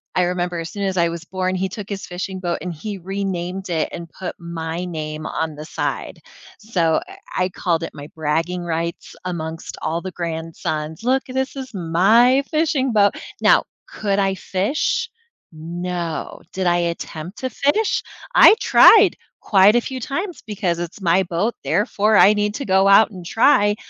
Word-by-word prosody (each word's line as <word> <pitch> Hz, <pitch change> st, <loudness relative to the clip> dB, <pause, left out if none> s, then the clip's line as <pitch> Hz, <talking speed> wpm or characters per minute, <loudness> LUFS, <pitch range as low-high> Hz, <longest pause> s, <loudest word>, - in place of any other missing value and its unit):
I 180 Hz, -, +3 dB
remember 175 Hz, -1 st, -1 dB
as 165 Hz, 0 st, -5 dB
soon 200 Hz, -, -4 dB
as 190 Hz, -1 st, -1 dB
I 170 Hz, -1 st, +3 dB
was 170 Hz, 0 st, -6 dB
born, 185 Hz, +1 st, -2 dB
he 190 Hz, +1 st, -1 dB
took 200 Hz, +1 st, -7 dB
his 195 Hz, -1 st, -5 dB
fishing 185 Hz, +1 st, -5 dB
boat, 175 Hz, -2 st, -1 dB
and 180 Hz, -1 st, -4 dB
he 200 Hz, +6 st, -6 dB
renamed 190 Hz, 0 st, -4 dB
it 160 Hz, -2 st, 0 dB
and 170 Hz, -1 st, -7 dB
put 180 Hz, +2 st, -7 dB
my 170 Hz, 0 st, -5 dB
name 155 Hz, -2 st, -5 dB
on 160 Hz, -1 st, -3 dB
the 150 Hz, +1 st, -8 dB
side, -, -, -4 dB, 0.4 s
so 175 Hz, -7 st, +1 dB
I 385 Hz, -, -11 dB, 0.3 s
I -, -, -2 dB
called 170 Hz, -2 st, -1 dB
it -, -, -5 dB
my 145 Hz, -1 st, -9 dB
bragging 165 Hz, +3 st, -1 dB
rights 170 Hz, 0 st, -4 dB
amongst 165 Hz, -2 st, -5 dB
all 165 Hz, +2 st, -2 dB
the 185 Hz, -, -6 dB
grandsons. 160 Hz, -2 st, -4 dB
"Look, 260 Hz, +2 st, +2 dB
this 265 Hz, +1 st, -2 dB
is 265 Hz, -2 st, -7 dB
my 215 Hz, +10 st, +4 dB
fishing 305 Hz, -5 st, +1 dB
boat." 205 Hz, -1 st, +4 dB, 0.3 s
Now, -, -, +5 dB, 0.2 s
could 200 Hz, -2 st, -1 dB
I 195 Hz, -1 st, +1 dB
fish? 215 Hz, -, -1 dB, 0.4 s
No. 170 Hz, +1 st, -5 dB
Did 190 Hz, -1 st, -1 dB
I 175 Hz, -, +4 dB
attempt 170 Hz, +1 st, -4 dB
to 260 Hz, -, -2 dB
fish? 290 Hz, -, +1 dB, 0.3 s
I -, -, +9 dB
tried -, -, +7 dB, 0.3 s
quite 200 Hz, +2 st, +5 dB
a -, -, +3 dB
few 260 Hz, +2 st, -5 dB
times 340 Hz, -, -4 dB
because 190 Hz, -5 st, -1 dB
it's 175 Hz, +3 st, -6 dB
my 180 Hz, +1 st, +3 dB
boat, 180 Hz, +6 st, -1 dB
therefore 210 Hz, +1 st, +1 dB
I 205 Hz, -, +7 dB
need 210 Hz, 0 st, 0 dB
to 280 Hz, -, -4 dB
go 190 Hz, 0 st, +3 dB
out 200 Hz, +2 st, +7 dB
and 180 Hz, -3 st, -10 dB
try, 205 Hz, 0 st, +4 dB
185 Hz, 175 wpm, -21 LUFS, 170-210 Hz, 0.4 s, I